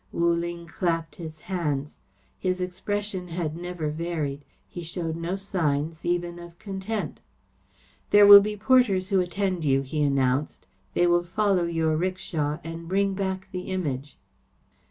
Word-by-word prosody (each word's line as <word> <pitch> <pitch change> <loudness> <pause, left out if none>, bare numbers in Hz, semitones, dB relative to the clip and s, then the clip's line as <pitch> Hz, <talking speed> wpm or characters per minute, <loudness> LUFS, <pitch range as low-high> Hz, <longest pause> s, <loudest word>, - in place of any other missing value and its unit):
Wu 170 0 +2
Ling 170 0 -3
clapped 165 -2 -2
his 155 -3 -8
hands. 150 -6 -2 0.5
His 185 0 -1
expression 190 +1 -3
had 165 -3 -3
never 175 -3 -4
varied. 155 -3 -3 0.2
He 175 - -7
showed 165 -1 -3
no 170 +3 -2
signs, 165 -5 -1
even 175 0 -1
of 170 0 -11
content. 200 +2 -4 0.9
"There 205 0 +7
will 200 0 +12
be 210 +1 -3
porters 205 -5 +3
who 195 -2 +3
attend 185 0 -1
you," 135 -2 +2
he 150 +3 -3
announced. 140 0 +1 0.3
"They 175 - +4
will 175 0 +4
follow 190 0 +1
your 165 -2 +1
'rickshaw 165 -4 -2
and 165 0 -7
bring 195 +2 +1
back 190 -1 -3
the 180 0 -5
Image." 145 -7 -3
175 Hz, 145 wpm, -26 LUFS, 160-190 Hz, 0.9 s, will